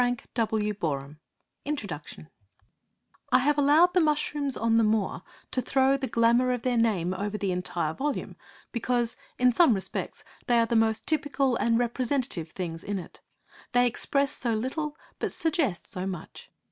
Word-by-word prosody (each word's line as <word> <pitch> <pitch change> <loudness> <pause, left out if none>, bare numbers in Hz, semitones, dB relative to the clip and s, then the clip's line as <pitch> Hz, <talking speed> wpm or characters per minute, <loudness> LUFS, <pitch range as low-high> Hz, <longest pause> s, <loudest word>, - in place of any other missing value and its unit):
LILY 245 0 +1 0.2
BY 235 - +2
WAY 210 -1 0
OF 140 -2 -2 0.5
INTRODUCTION 205 - -5 1.0
I - - +7
have 290 +3 +2
allowed 310 +5 +5
the 360 - +4
Mushrooms 295 -2 +1
on 230 0 +2
the 230 - +4
Moor 215 -2 0 0.3
to 255 - +1
throw 265 +2 +3
the 270 -1 -3
glamour 235 +2 +3
of 245 - -4
their 250 -1 +1
name 205 -7 +1
over 205 +2 -3
the 200 -2 -1
entire 175 -3 -2
volume 285 - -3 0.4
because, 240 0 0 0.2
in 250 0 +4
some 250 -2 +5
respects, 190 - -3 0.2
they 240 - +4
are 230 - +4
the 230 - -1
most 225 0 +2
typical 285 -4 +1
and 230 0 +2
representative 245 - 0
things 165 -2 -5
in 205 -1 -3
it. 180 - -9 0.5
They 245 0 +5
express 275 +3 +1
so 235 -5 -1
little 290 +7 -3 0.2
but - - -2
suggest 305 - 0
so 185 +1 -2
much! 180 -4 -8
235 Hz, 165 wpm, -27 LUFS, 205-275 Hz, 1.0 s, I